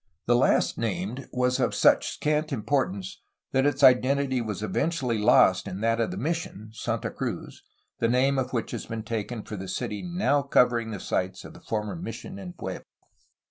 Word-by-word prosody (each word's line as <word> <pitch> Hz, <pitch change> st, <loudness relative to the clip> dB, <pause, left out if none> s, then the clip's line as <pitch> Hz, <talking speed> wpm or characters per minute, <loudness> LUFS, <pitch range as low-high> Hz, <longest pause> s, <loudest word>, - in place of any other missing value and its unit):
The 120 Hz, -, +4 dB
last 120 Hz, -, +2 dB
named 135 Hz, -, -3 dB
was 125 Hz, +1 st, +1 dB
of 125 Hz, -, +1 dB
such -, -, +4 dB
scant 150 Hz, +1 st, -1 dB
importance 145 Hz, -, -1 dB, 0.3 s
that 135 Hz, +1 st, +3 dB
its 145 Hz, -, 0 dB
identity 130 Hz, 0 st, +4 dB
was 105 Hz, -3 st, -4 dB
eventually 125 Hz, -1 st, 0 dB
lost 105 Hz, -, +5 dB
in 95 Hz, -, -5 dB
that 115 Hz, +1 st, +2 dB
of 115 Hz, -, 0 dB
the -, -, -5 dB
mission, 125 Hz, -, -3 dB
Santa -, -, -3 dB
Cruz, -, -, -5 dB, 0.4 s
the 115 Hz, -, +2 dB
name 135 Hz, +3 st, +3 dB
of 130 Hz, -1 st, -2 dB
which 115 Hz, -3 st, -2 dB
has -, -, -5 dB
been 110 Hz, -1 st, -4 dB
taken 115 Hz, 0 st, -4 dB
for 105 Hz, -, -7 dB
the 95 Hz, 0 st, -6 dB
city 100 Hz, +2 st, -3 dB
now 175 Hz, -5 st, +1 dB
covering 120 Hz, -4 st, +2 dB
the 105 Hz, -3 st, -5 dB
sites 95 Hz, 0 st, -2 dB
of -, -, -10 dB
the -, -, -14 dB
former 105 Hz, +3 st, -3 dB
mission 190 Hz, +2 st, -7 dB
and 180 Hz, -2 st, -9 dB
pueblo. 95 Hz, -1 st, -5 dB
125 Hz, 180 wpm, -27 LUFS, 110-145 Hz, 0.4 s, lost